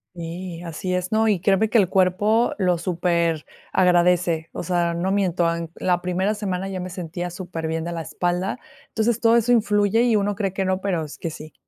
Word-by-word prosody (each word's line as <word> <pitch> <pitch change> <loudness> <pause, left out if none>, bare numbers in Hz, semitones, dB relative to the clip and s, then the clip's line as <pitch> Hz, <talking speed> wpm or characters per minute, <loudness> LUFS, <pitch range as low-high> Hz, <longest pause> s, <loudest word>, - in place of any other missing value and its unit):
Sí, 170 +1 -6
así 175 +2 -4
es. 180 +2 -2
No, 220 0 +3
y 200 - +2
créeme 200 +4 +2
que 235 - +3
el 195 -5 +4
cuerpo 195 +5 +2
lo 180 -3 +2
superagradece. 175 0 +1
O - - -5
sea, 175 -1 0
no 175 +3 -1
miento, 180 -4 +1
en 165 -1 -6
la 180 -1 0
primera 185 +4 0
semana 195 -2 -3
ya 185 -2 -4
me 185 - -5
sentía 175 0 -5
superbién 165 -2 -4
de 175 - -4
la 165 - -3
espalda. 175 +6 -2 0.3
Entonces, 225 0 0
todo 230 0 +5
eso 235 +1 +3
influye 210 -1 +3
y 235 -3 +3
uno 205 0 0
cree 195 -2 -1
que 195 +1 -2
no, 185 0 0
pero 175 -6 -1
es 150 - -10
que 165 - -4
sí. 155 0 -10
180 Hz, 200 wpm, -23 LUFS, 170-200 Hz, 0.3 s, todo